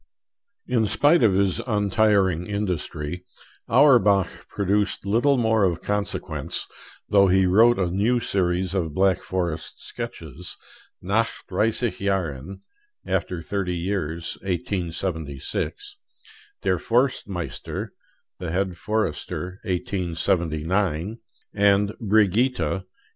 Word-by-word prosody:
In 115 -4 +1
spite 145 - +4
of 105 -5 +4
his 95 -1 +2
untiring 100 -4 +2
industry, 90 -5 -3 0.5
Auerbach 115 - +4
produced 100 +1 0
little 120 +7 +3
more 110 -3 +2
of 85 -4 0
consequence, 105 0 -2 0.4
though 100 -1 +5
he 95 +1 +4
wrote 115 +6 +5
a 95 - +1
new 110 +7 +2
series 90 -3 0
of 80 -6 -2
Black 95 -1 +3
Forest 85 -4 -4
sketches: - - -7 0.5
'Nach - - 0
Dreissig 115 +1 0
Jahren' 95 -4 -2 0.4
(After 85 -3 -2
Thirty 95 -2 -2
Years: 85 -2 -3
1876); 90 - -3 0.7
'Der - - +1
Forstmeister' 115 -7 -1 0.5
(The 90 -2 -4
Head 90 +1 -1
Forester: 95 -2 -2
1879); 90 +1 -1 0.3
and 100 0 +3
'Brigitta' 105 - +2
(1880). 95 - -25
95 Hz, 100 wpm, -24 LUFS, 90-105 Hz, 0.7 s, though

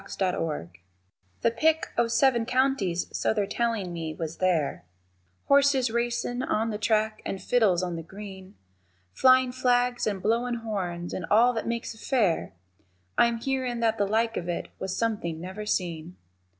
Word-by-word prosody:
_ - - -16
THE 190 -2 +2
FAIR 155 - -3 0.7
The 230 - +4
pick 315 +7 +1
o' 235 0 +2
seven 235 0 +2
counties, 255 -9 +1
so - - +1
they're 205 -2 +1
tellin' 220 -4 -1
me, 160 -2 -4
was 160 0 -5
there, 175 -6 0 0.6
Horses 280 -3 +4
racin' 240 +1 -1
on 225 -2 0
the 210 - -4
track, 215 0 +1
and 195 - -4
fiddles 195 -4 +2
on 175 -2 -3
the - - -4
green, 190 +2 -10 0.6
Flyin' 255 - +5
flags 245 -1 +1
and 200 -2 -1
blowin' 235 +4 0
horns 175 -5 -3
and 180 - -4
all 235 +4 +5
that 225 - -3
makes 235 0 -3
a 220 - -16
fair, 210 - 0 0.6
I'm 235 0 +3
hearin' 255 -1 -2
that 225 -1 +1
the 200 - +2
like 225 +2 +1
of 175 - -4
it 175 - -3
was 190 -1 -3
something 205 -8 -1
never 190 +5 -7
seen. 175 -3 -2
220 Hz, 165 wpm, -27 LUFS, 185-240 Hz, 0.7 s, Flyin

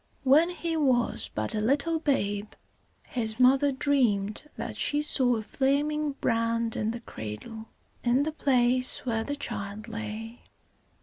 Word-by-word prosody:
When 295 +6 +5
he 340 -2 -3
was 260 -6 +1
but 110 0 0
a 215 - -1
little 285 +8 +1
babe, 205 -9 -1 0.5
his 225 -2 -4
mother 270 +3 +5
dreamed 255 -4 0
that - - -5
she 295 0 0
saw 255 -5 +3
a 220 - -3
flaming 290 +4 0
brand 230 -2 0
in 215 - -1
the 235 +1 -4
cradle, 165 - -8 0.4
in 250 +3 +3
the 315 - -1
place 255 -4 +2
where 225 -3 0
the 285 +4 -3
child 205 -5 -5
lay. 225 +1 -6
245 Hz, 140 wpm, -28 LUFS, 220-285 Hz, 0.5 s, When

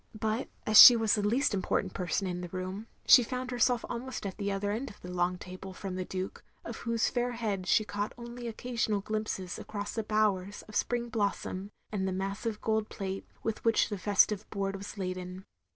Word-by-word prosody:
But 220 +3 -1 0.2
as 215 0 +10
she 245 - +12
was 225 -2 +2
the 210 - +2
least 230 +6 +2
important 190 -1 0
person 180 +2 -1
in 180 -1 -3
the 175 - -5
room, 185 +4 -5 0.2
she 250 - +9
found 255 +2 -4
herself 245 0 +2
almost 245 -1 -5
at 195 - -4
the 200 0 -1
other 200 +1 -1
end 240 +6 -3
of 210 - -14
the 180 - -8
long 180 0 0
table, 185 +1 -9
from 195 -1 -5
the 185 - -2
Duke 185 +1 -5 0.2
of 230 - -6
whose 230 -1 0
fair 245 0 -1
head 205 -6 -2
she 215 - +4
caught 205 0 -3
only 240 0 -7
occasional 230 -2 -1
glimpses 215 -3 -3
across 205 -1 -5
the 225 - -1
bowers 205 -2 0
of 215 - -13
spring 240 -1 0
blossom 200 -3 -2 0.2
and 190 -3 -1
the - - -1
massive 200 +3 -3
gold 220 -1 0
plate 195 -1 -5 0.2
with 225 -1 -3
which 225 -2 +3
the 205 - -3
festive 205 +1 +2
board 195 -1 -2
was 200 +2 -8
laden. 185 0 -5
205 Hz, 200 wpm, -30 LUFS, 190-225 Hz, 0.2 s, she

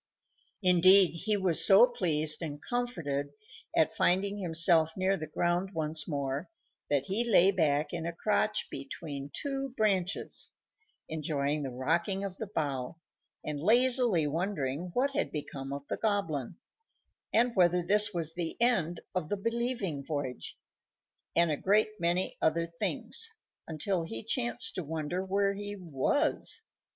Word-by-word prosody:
Indeed, 185 +1 +6
he 205 +5 -1
was 185 -4 +4
so - - +8
pleased 155 - 0
and 145 -3 -5
comforted 155 - -3 0.4
at - - +3
finding 200 +1 +1
himself 165 -2 +3
near 190 +1 +2
the 155 -4 -6
ground 175 +4 -1
once 155 -1 -1
more 140 0 -3 0.4
that 140 -2 +1
he 205 +5 0
lay 195 -5 +5
back 150 -5 +1
in 170 -1 -3
a - - -2
crotch 210 +4 0
between 140 0 -6
two 275 - -4
branches, 195 -4 0 0.5
enjoying 150 -2 -2
the 135 - -3
rocking 170 - -1
of 195 -1 -5
the 220 - -5
bough, 145 -7 -3 0.5
and 150 -1 -3
lazily 240 - +4
wondering 160 -1 -2
what 275 +3 +2
had - - -1
become 140 -2 -5
of 140 0 -6
the - - -3
Goblin, 175 - -1 0.8
and 235 +2 +2
whether 180 -1 +3
this 210 +3 +5
was 165 -4 -3
the 170 -1 -4
end 185 -9 +1
of 180 -5 -2
the 205 - -1
Believing 230 - -2
Voyage, 140 -4 -4 0.8
and 170 -1 +4
a 150 - -1
great 215 +3 +1
many 175 +2 0
other 165 +1 +2
things, 170 - -1 0.4
until 170 +3 -1
he 115 -9 -5
chanced 120 0 0
to 185 - -4
wonder 160 +4 -3
where 200 +1 +1
he 205 +1 -6
was. 195 - -1
175 Hz, 140 wpm, -30 LUFS, 150-200 Hz, 0.8 s, so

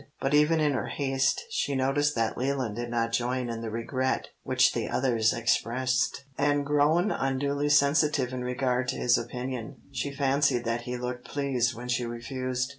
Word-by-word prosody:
But 135 +1 -1
even 150 +2 +4
in 150 -1 +3
her 130 - -2
haste 135 -1 0
she 140 - -1
noticed 145 +3 +1
that 115 -1 0
Leland 130 -4 -1
did 120 +1 -4
not 115 -1 0
join 125 +1 -1
in 115 0 -5
the 115 - -4
regret 130 +4 -2
which - - +3
the - - -2
others 115 -4 +2
expressed, 120 +1 0 0.2
and 145 0 +2
grown 150 +7 +3
unduly 140 +2 0
sensitive 145 -2 +3
in 125 -1 -3
regard 125 0 0
to - - -1
his 120 0 +3
opinion, 125 0 -4 0.2
she 140 +1 -3
fancied 140 -2 +1
that 115 +1 -1
he 125 - -2
looked 125 0 -5
pleased 130 -4 0
when 120 +2 -7
she 125 0 0
refused. 125 +2 -3
130 Hz, 175 wpm, -28 LUFS, 120-140 Hz, 0.2 s, even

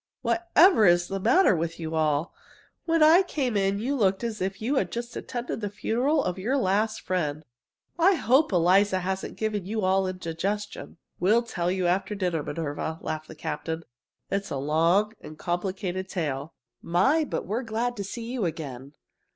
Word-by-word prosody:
Whatever 345 - +4
is 175 0 +3
the 195 - -2
matter 235 - +4
with 165 0 -3
you 160 -1 -4
all? 155 +1 0 0.5
When 330 -2 +3
I 325 +4 +7
came 275 - -2
in 195 0 +1
you 255 +7 -1
looked 195 -4 +1
as 225 -4 -3
if 190 +1 -2
you'd 260 +6 0
just 235 +1 -5
attended 240 -2 -4
the 205 - -2
funeral 250 +8 0
of 180 - -3
your 245 +9 0
last 215 -1 +1
friend. 155 -4 -2 0.5
I 375 +3 +5
hope 275 -1 +3
Eliza 185 +2 +3
hasn't 190 +1 -4
given 210 -4 -2
you 220 +1 -2
all 190 0 +2
indigestion!" 185 +3 -4 0.2
"We'll 215 +7 +3
tell 175 -7 -2
you 185 0 0
after 190 +4 0
dinner, 180 -5 -1
Minerva," 160 +1 -4
laughed 155 0 -4
the 160 - -10
captain. 160 +1 -4 0.5
"It's 200 0 -1
a - - -3
long 165 +9 +2
and 155 - -10
complicated 185 +2 -3
tale. 150 -4 -3 0.3
My, 235 - +2
but 295 - -3
we're 215 +7 -2
glad 235 +1 -2
to 200 - -3
see 230 +4 -6
you 235 -2 -2
again!" 140 -5 -6
195 Hz, 170 wpm, -26 LUFS, 170-230 Hz, 0.5 s, I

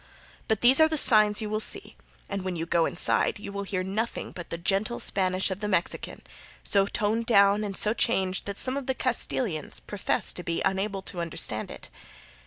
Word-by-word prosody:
But 220 -2 -1
these 255 +4 +6
are 315 - +6
the 315 - -1
signs 215 -4 +7
you 210 - -5
will 215 - -2
see, 395 - -2 0.3
and 200 -1 -5
when 185 -1 -5
you 165 0 -5
go 170 -1 0
inside 175 - +5
you 205 -1 -10
will 200 0 -6
hear 195 -2 -4
nothing 215 +5 -5
but 175 - -10
the 165 - -5
gentle 195 +6 -2
Spanish 185 0 -1
of 190 - -5
the 210 - -5
Mexican, 185 -4 -3 0.4
so 200 -1 +1
toned 220 +2 -3
down 200 -1 +3
and 200 -2 -4
so 215 - +3
changed 190 -6 -1
that 200 -1 -6
some 260 +1 +3
of 280 - -7
the 265 - -2
Castilians 220 - -2
profess 205 -2 -1
to - - -8
be 165 -1 -4
unable 195 0 -3
to 175 -2 -4
understand 165 -10 -2
it. - - -10
200 Hz, 200 wpm, -25 LUFS, 185-220 Hz, 0.4 s, signs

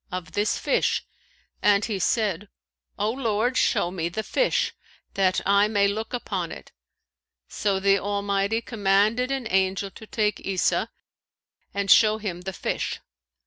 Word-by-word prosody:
) - - -35
of 180 -1 -5
this 210 +2 0
fish, - - 0 0.6
and 205 0 +4
he 210 -4 -3
said, 205 -1 0 0.5
'O 210 +2 0
Lord 240 -1 0
show 175 - +2
me 170 -2 -2
the 220 +6 -4
fish, - - +1 0.4
that 190 -1 +2
I 200 +1 +4
may 205 -2 +2
look 215 +2 -3
upon 245 - -3
it.' - - -10 0.8
So 200 -2 -1
the 195 0 +3
Almighty 200 +2 -1
commanded 215 +3 +1
an 270 -2 -2
angel 190 +1 +1
to 220 - -13
take 210 -2 0
Isa 190 -2 0 0.8
and 200 -1 0
show 215 -1 +6
him 190 -5 -5
the 190 +1 -5
fish. - - -3
200 Hz, 145 wpm, -25 LUFS, 195-220 Hz, 0.8 s, show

